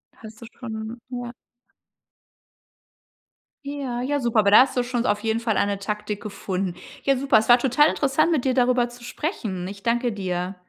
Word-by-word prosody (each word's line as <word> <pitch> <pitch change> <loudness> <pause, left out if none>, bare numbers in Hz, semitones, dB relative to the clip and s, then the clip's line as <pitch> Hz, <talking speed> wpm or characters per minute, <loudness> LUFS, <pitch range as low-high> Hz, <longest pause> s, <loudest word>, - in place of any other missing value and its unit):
Hast 220 0 -13
du 230 - -8
schon 225 -1 -7
ja. 245 -1 -5 2.3
Ja, 270 -4 -4
ja, 285 +3 -1
super, 235 -4 +1
aber 200 -1 +4
da 210 - +9
hast 265 - +1
du 250 - +2
schon 245 -1 -2
auf 210 -3 +1
jeden 220 +1 -1
Fall 230 -2 -1
eine 200 0 +1
Taktik 210 +1 -4
gefunden. 195 -3 -3 0.3
Ja, 275 -1 +3
super, 270 -1 +3
es 220 - +1
war 240 0 +7
total 270 +4 +4
interessant, 285 +4 +1
mit 295 -6 +1
dir 260 -2 +1
darüber 245 -1 +2
zu 240 0 -14
sprechen. 215 - -4
Ich 200 0 -9
danke 240 +1 +1
dir. 185 -2 -3
235 Hz, 180 wpm, -23 LUFS, 210-255 Hz, 2.3 s, da